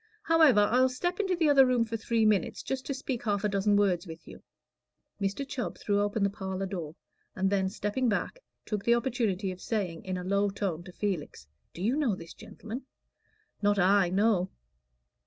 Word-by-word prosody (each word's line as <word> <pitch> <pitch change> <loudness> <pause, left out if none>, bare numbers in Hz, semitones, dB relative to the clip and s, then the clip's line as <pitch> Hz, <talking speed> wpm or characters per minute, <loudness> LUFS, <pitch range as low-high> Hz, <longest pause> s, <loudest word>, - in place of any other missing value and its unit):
However, 315 -9 +5
I'll 250 +5 +4
step 350 +9 -2
into 380 -3 +1
the 335 -2 +2
other 280 -2 +7
room 250 -3 +2
for 225 0 -4
three 225 0 +1
minutes, 205 -5 +1
just 265 -1 -4
to 275 - -1
speak 260 -2 -4
half 205 -3 0
a - - +3
dozen 200 +1 +2
words 195 -3 +2
with 165 0 -10
you." - - -11 0.8
Mr. 200 +8 -2
Chubb 255 -3 -4
threw 205 -1 0
open 205 0 0
the 200 - +3
parlor 190 -1 -4
door, 170 -5 -5 0.4
and 190 +1 0
then 190 -1 +1
stepping 210 +6 -1
back, 220 - -2 0.3
took 210 -2 -3
the 235 - +4
opportunity 225 -6 -1
of 185 - -10
saying, 190 -7 -3
in 185 -1 -3
a 180 - -5
low 200 +2 +1
tone, 195 -4 -3
to 180 - -10
Felix, 180 - -4 0.3
"Do 175 - -5
you 235 +6 +2
know 280 -9 +1
this 165 -2 -10
gentleman?" 240 +5 -9 0.7
"Not 205 0 +2
I; 195 0 +4
no." 195 -1 +2
205 Hz, 195 wpm, -29 LUFS, 190-245 Hz, 0.8 s, other